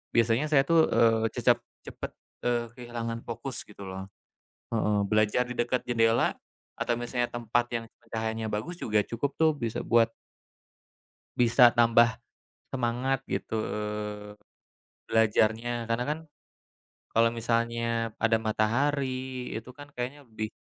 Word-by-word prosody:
biasanya 115 +4 +3
saya 150 -3 +5
tuh, 160 +2 +4
eee, 115 -1 +4
cecep 120 -1 +3 0.3
cepet, - - -7 0.3
eee, 120 -1 +2
kehilangan 115 -1 -5
fokus 120 +1 -3
gitu 105 -1 -14
loh, 95 0 -6 0.7
heeh, 105 -2 +2
belajar 110 +3 +2
di 125 - -5
dekat 120 +1 0
jendela 115 -1 +3 0.4
atau 120 -1 -1
misalnya 120 0 -1
tempat 120 0 0
yang 115 -1 -2 0.3
cahayanya 110 0 -2
bagus 105 +13 -3
juga 105 -1 +2
cukup 120 +4 -2
tuh 160 -1 +4
bisa 115 -6 -3
buat 115 -1 +3 1.3
bisa 120 0 +6
tambah 115 -1 +4 0.5
semangat 125 +1 0
gitu 110 - -2 1.5
belajarnya. 110 +2 +2
Karena 115 +1 -1
kan 150 +1 0 0.9
kalo 115 +1 +4
misalnya 115 -1 0
ada 115 -1 +4
matahari, 130 +3 -1
itu 115 +3 -6
kan 145 +1 -12
kayaknya 130 +4 -5
lebih 110 -4 -5
115 Hz, 120 wpm, -28 LUFS, 115-125 Hz, 1.5 s, bisa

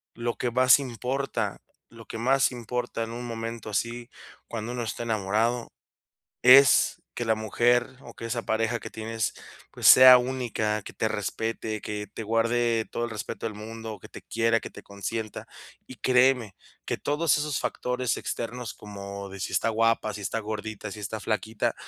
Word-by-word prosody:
lo 120 0 -2
que 120 - -1
más 130 +1 +6
importa 135 +1 -3 0.3
lo 115 -1 -13
que - - -6
más 135 +3 +3
importa 120 -1 -3
en 115 - -6
un 120 +1 -6
momento 115 -1 -5
así, 120 +3 -2 0.4
cuando 115 +1 -5
uno 120 -1 -3
esté 115 - -4
enamorado 115 +2 0 0.7
es 135 +2 +7
que 120 - -2
la 110 -1 +2
mujer, 120 +4 +1
o 120 - -12
que - - -8
esa 120 +1 -2
pareja 115 +1 0
que - - -8
tienes 110 0 -3 0.4
pues, - - 0
sea 130 0 +11
única, 120 -4 -1
que - - -9
te - - 0
respete, 110 -1 -3
que 105 -1 -5
te 110 +2 -7
guarde 115 +1 +1
todo 120 - -2
el 120 - -6
respeto 105 +1 -5
del 110 - -3
mundo 110 +1 -7
o - - -11
que - - -12
te - - -10
quiera, 115 0 +1
que - - -8
te - - -12
consienta 105 +2 -5 0.4
y 130 - -10
créeme 125 -3 +3 0.3
que - - -2
todos 150 +2 +1
esos 150 -3 -1
factores 125 -1 -1
externos 120 0 -4
como 100 -1 -8
de 95 0 -9
si - - -4
está 115 - +2
guapa, 115 -1 +1
si 105 - -6
está 115 +3 -2
gordita, 110 -1 -5
si 105 - -8
está 105 +2 -4
flaquita, 110 0 -1
115 Hz, 180 wpm, -27 LUFS, 110-125 Hz, 0.7 s, sea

